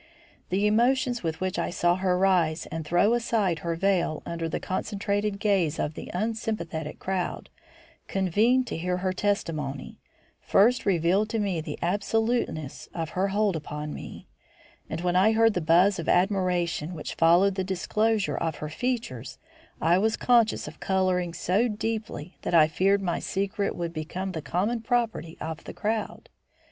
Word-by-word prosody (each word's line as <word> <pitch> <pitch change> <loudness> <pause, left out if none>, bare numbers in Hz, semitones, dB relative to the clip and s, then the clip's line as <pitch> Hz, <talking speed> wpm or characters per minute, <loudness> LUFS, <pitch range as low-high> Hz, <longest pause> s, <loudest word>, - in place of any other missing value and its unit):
The 195 +3 +1
emotions 245 +3 +2
with 160 -2 -3
which 185 -1 -2
I - - -1
saw 175 0 +2
her 185 -1 +1
rise 180 -4 +2
and 160 0 -3
throw 175 +8 +3
aside 220 -8 +1
her 170 -1 -2
veil 175 -3 0
under 165 -1 -3
the - - -2
concentrated 205 +1 -2
gaze 195 -7 +1
of 150 - -2
the - - -8
unsympathetic 180 -7 -3
crowd 190 -2 -3 0.6
convened 215 +7 +2
to - - -4
hear 180 +2 -1
her 185 - +1
testimony, 160 -9 -2 0.4
first 230 +4 +3
revealed 190 +3 +2
to 225 - -1
me 190 -6 -1
the - - -6
absoluteness 205 - -1
of 165 -2 -3
her 190 +2 0
hold 205 -1 +1
upon 150 -1 -5
me; - - -9 0.6
and 160 - -4
when 175 0 0
I 200 +5 +5
heard 225 0 +4
the 180 - -1
buzz 175 +5 +4
of 165 - -3
admiration 180 -3 +1
which 150 - -5
followed 175 +4 +4
the 190 0 -2
disclosure 210 +3 0
of 165 -2 -1
her 150 - -6
features, 155 - -3 0.4
I 170 +3 +3
was 220 +2 +1
conscious 235 -8 +3
of 150 +1 -10
colouring 185 -2 +1
so 190 +8 +1
deeply 215 -6 -4
that 175 - -1
I 155 -2 +7
feared 195 +5 +2
my 175 -2 -1
secret 200 +1 -2
would 170 -1 -4
become 175 +4 -4
the 160 -3 -4
common 210 +10 -1
property 225 -8 -1
of 160 0 -5
the - - -7
crowd. 215 +1 -3
185 Hz, 160 wpm, -27 LUFS, 165-210 Hz, 0.6 s, I